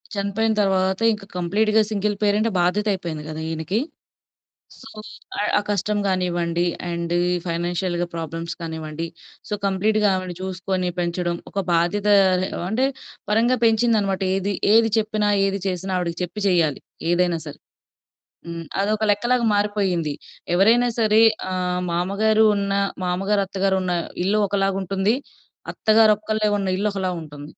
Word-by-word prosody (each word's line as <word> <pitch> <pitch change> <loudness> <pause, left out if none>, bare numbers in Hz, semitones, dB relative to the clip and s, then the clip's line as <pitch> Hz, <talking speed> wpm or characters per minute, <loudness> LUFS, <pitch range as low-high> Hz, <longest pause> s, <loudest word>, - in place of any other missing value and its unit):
చనిపోయిన 200 +3 0
తరువాత 190 0 +1
ఇంకా 210 -2 -8
కంప్లీట్‌గా 215 +5 +2
సింగిల్ 205 0 0
పేరెంట్ 210 +2 +2
బాధ్యత 205 +5 +1
అయిపోయింది 165 -5 -5
కదా! 155 0 -5
ఈయనకి. 160 +7 -2 1.0
సో, 270 - -11 0.7
ఆ - - +1
కష్టం 205 +1 0
గానివ్వండి 175 -2 0 0.3
అండ్ 170 0 -3
ఈ 175 - +1 0.2
ఫైనాన్షియల్‌గా 175 +1 -1
ప్రాబ్లమ్స్ 165 +1 -5
కానివ్వండి, 160 0 -5 0.4
సో, 210 - -1
కంప్లీట్‌గా 210 +2 +2
ఆవిడని 185 -2 -4
చూసుకొని 185 0 -2
పెంచడం, 175 0 -1
ఒక - - -4 0.2
బాధ్యత 185 +5 +1 0.6
అంటే 255 +4 +2 0.4
పరంగా 235 +4 +3
పెంచిందన్నమాట. 220 -4 +2
ఏది 195 +1 -1 0.2
ఏది 225 -1 +5
చెప్పినా, 215 -1 0 0.2
ఏది 195 0 -2
చేసినా 185 +1 -3
ఆవిడకి 170 -1 -3
చెప్పి 205 +5 -6
చేయాలి 165 -6 +2 0.3
ఏదైనా 175 -1 +2
సరే. 145 - -8 0.9
హ్మ్. 170 0 -6 0.2
అదొక 215 +2 0
లెక్కలాగా 240 +4 +1
మారిపోయింది. 195 -7 0 0.4
ఎవరైనా 230 +6 +4
సరే 220 0 +4 0.3
ఆహ్, 180 -1 -1
మామగారు 210 +5 +2
ఉన్న 200 0 -1 0.3
మామగారు, 195 +3 0
అత్తగారు 195 0 0
ఉన్న 180 - -1 0.3
ఇల్లు 210 +3 +2
ఒకలాగుంటుంది. 195 +1 0 0.6
అత్తగారొక్కళ్ళే 215 -1 +3
ఉన్న 195 -1 -2
ఇల్లు 210 +1 0
ఒకలా 185 -2 -1
ఉంటుంది. 145 -2 -10
195 Hz, 125 wpm, -22 LUFS, 175-210 Hz, 1.0 s, ఏది